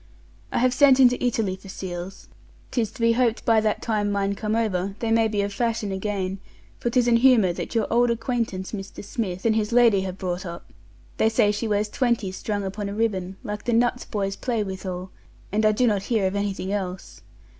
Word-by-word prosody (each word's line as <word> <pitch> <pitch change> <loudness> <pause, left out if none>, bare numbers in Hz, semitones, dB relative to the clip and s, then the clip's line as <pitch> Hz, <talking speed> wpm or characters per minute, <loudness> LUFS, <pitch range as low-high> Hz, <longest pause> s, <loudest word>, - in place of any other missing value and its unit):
I - - -1
have 250 +1 +3
sent 270 -1 +6
into 250 -1 +5
Italy 225 -6 0
for 190 +1 -14
seals; 185 0 -7 0.4
'tis 230 -4 0
to 265 - -10
be 230 0 +4
hoped 235 -1 +1
by 225 -3 +4
that 215 -1 -1
time 210 -3 0
mine 200 0 0
come 215 +2 -2
over, 200 -4 -1
they 225 0 -2
may 225 0 +4
be 210 -2 0
of 200 0 -3
fashion 225 -2 -1
again, 195 -1 -2 0.4
for 240 - -1
'tis 245 0 +2
an 235 -1 +5
humour 230 -7 +5
that 175 - -6
your 225 -2 +2
old 240 +1 +4
acquaintance 230 -5 -2
Mr. 200 -1 -7
Smith 190 -4 -4
and 220 -1 +3
his 215 0 0
lady 235 -5 +5
have 190 -1 -5
brought 180 -1 -3
up; 170 -2 -9 0.4
they 220 - +3
say 210 -2 +3
she 210 +2 -2
wears 210 0 +1
twenty 235 -4 0
strung 205 +1 -3
upon 200 +1 -4
a 200 - -5
ribbon, 195 -4 -1
like 210 0 -5
the 240 - +1
nuts 240 +1 +2
boys 195 -2 -3
play 235 -4 -1
withal, 185 -1 -6 0.4
and 215 +2 +3
I - - +5
do 230 +4 +2
not 205 -4 +2
hear 215 -1 0
of 190 +1 0
anything 200 -1 -2
else. 190 -2 -5
210 Hz, 210 wpm, -24 LUFS, 195-230 Hz, 0.4 s, sent